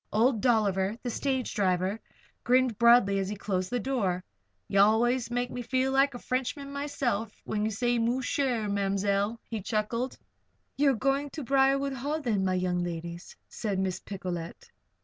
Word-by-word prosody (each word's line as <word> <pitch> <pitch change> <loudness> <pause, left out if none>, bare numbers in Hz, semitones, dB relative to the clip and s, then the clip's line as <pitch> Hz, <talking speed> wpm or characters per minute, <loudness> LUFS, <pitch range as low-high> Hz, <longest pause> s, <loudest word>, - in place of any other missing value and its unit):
Old 225 +1 +2
Dolliver, 210 -4 +2
the 245 - -2
stage 260 0 -1
driver, 190 +1 0 0.4
grinned 250 -3 +2
broadly 235 -4 +6
as 190 0 -2
he 210 - -3
closed 185 -2 -2
the 245 - -1
door. 200 -8 -1 0.4
"Ye 195 - +1
allus 235 +4 +3
make 245 0 -1
me 250 - -4
feel 260 +2 0
like 270 0 +3
a - - -3
Frenchman 265 +3 -3
myself, 250 -7 -2
when 210 -1 -1
ye - - +1
say 240 +3 0
'moosher,' 250 -1 0
Ma'mzell," 200 +2 0
he 225 -3 -4
chuckled. 225 +5 -2 0.6
"You 285 0 +3
are 270 - +2
going 275 +4 0
to 305 - -5
Briarwood 275 +1 +2
Hall, 285 +5 -2
then, 225 -9 0
my 185 -1 +1
young 180 -1 0
ladies?" 170 0 -6
said 205 -3 -3
Miss 190 -1 -1
Picolet. 185 - -6
230 Hz, 165 wpm, -28 LUFS, 195-260 Hz, 0.6 s, broadly